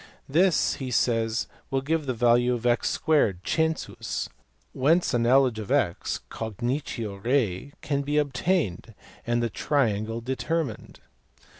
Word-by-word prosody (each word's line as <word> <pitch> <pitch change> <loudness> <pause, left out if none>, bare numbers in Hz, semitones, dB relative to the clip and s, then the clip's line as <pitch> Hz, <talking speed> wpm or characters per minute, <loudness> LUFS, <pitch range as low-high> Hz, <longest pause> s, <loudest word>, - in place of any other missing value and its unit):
This 170 +5 +3
he 130 -2 -4
says 115 -2 +1 0.2
will 135 0 0
give 155 0 -1
the 130 - 0
value 120 +1 +3
of 120 0 -6
x 120 -1 +1
2 150 - +4
(census), 160 -1 -1 0.4
whence 160 +6 +2
a 120 - +2
knowledge 125 -1 +3
of 105 - -6
x 130 -11 0
(cognitio 115 -2 -4
rei) 125 -1 0
can 140 -2 0
be 145 +1 -1
obtained, 140 - 0 0.3
and 120 0 +1
the 115 - 0
triangle 115 -3 0
determined. 135 +6 -3
125 Hz, 130 wpm, -26 LUFS, 115-145 Hz, 0.4 s, 2